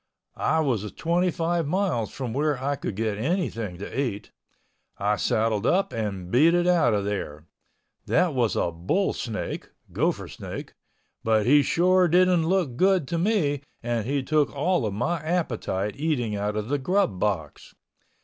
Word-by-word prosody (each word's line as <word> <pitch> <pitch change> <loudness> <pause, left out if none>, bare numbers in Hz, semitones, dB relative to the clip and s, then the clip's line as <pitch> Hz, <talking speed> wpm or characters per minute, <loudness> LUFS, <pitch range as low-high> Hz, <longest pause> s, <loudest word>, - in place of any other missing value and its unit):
I 160 0 +1
was 115 -8 -1
twenty 175 +2 +1
five 170 -1 -1
miles 175 - 0
from 125 -4 -5
where 145 +1 +1
I 140 +2 -1
could 125 -7 -5
get 110 -1 -2
anything 115 - -2
to 110 +7 -3
eat. 110 -7 -4 0.7
I 105 +1 +1
saddled 110 +1 0
up 195 +2 +2
and 100 -5 -4
beat 160 +7 +5
it 175 0 +2
out 165 -11 +3
of 100 -1 -1
there. 80 -7 -4 0.6
That 180 -4 +2
was 120 -5 +1
a 85 - 0
bull 90 - 0
snake 110 -3 -5 0.2
(Gopher - - 0
Snake) - - -8 0.5
but 110 -1 +2
he 145 +4 +6
sure 180 +5 +3
didn't 180 -1 +3
look 170 -9 0
good 185 -4 +3
to 170 - -1
me 165 -8 +1 0.2
and 115 -2 -1
he 140 0 0
took 150 +1 +1
all 160 -3 +1
of 100 - -3
my 165 +10 -1
appetite, 125 - -2
eating 135 -8 -1
out 105 +1 -2
of 105 0 -2
the 145 0 0
grub 140 - +1
box. 90 -8 -3
135 Hz, 165 wpm, -25 LUFS, 105-170 Hz, 0.7 s, he